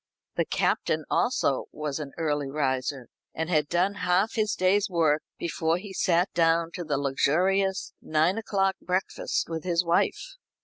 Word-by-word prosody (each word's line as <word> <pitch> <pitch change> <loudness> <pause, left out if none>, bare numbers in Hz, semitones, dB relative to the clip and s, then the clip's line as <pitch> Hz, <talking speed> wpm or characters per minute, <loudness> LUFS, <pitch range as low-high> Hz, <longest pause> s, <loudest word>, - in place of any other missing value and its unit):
The - - +1
Captain - - 0
also - - +1
was 150 -1 -4
an 145 -3 -6
early 145 -3 -1
riser, 135 -2 -1 0.3
and 160 +2 -2
had 150 -3 +2
done 180 +3 +2
half 185 +4 +2
his 215 -2 0
day's 190 +3 +2
work 160 -4 +2 0.2
before 165 0 0
he 190 +1 -9
sat 180 +1 +1
down 165 0 +2
to 175 0 -5
the 150 -3 -1
luxurious 185 +8 +1
nine 160 +7 +1
o'clock 195 -3 0
breakfast 185 +1 -1
with 165 -1 -4
his 175 -1 +1
wife. - - 0
170 Hz, 150 wpm, -27 LUFS, 150-190 Hz, 0.3 s, had